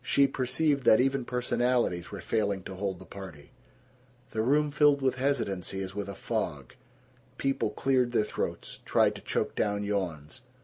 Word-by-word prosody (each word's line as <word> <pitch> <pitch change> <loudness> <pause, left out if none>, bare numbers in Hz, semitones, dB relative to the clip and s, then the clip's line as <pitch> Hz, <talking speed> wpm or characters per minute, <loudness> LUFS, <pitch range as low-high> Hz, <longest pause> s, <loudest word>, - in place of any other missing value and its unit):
She 140 +3 +4
perceived 135 +2 0
that 110 - +7
even 135 0 +1
personalities 120 -7 0
were 100 - -7
failing 100 -3 0
to 95 - -7
hold 95 0 -3
the 95 - -12
party. 90 -7 -10 0.8
The 110 - -1
room 145 +5 +2
filled 145 -1 +4
with 130 -1 0
hesitancy 110 -9 -1
as 95 0 -6
with 100 0 -4
a 100 - -6
fog. - - -3 0.6
People 135 0 0
cleared 130 -2 +1
their 115 - +3
throats, - - -4
tried - - +3
to - - -10
choke - - -1
down 105 -1 0
yawns. 95 - -3
115 Hz, 165 wpm, -29 LUFS, 100-135 Hz, 0.8 s, that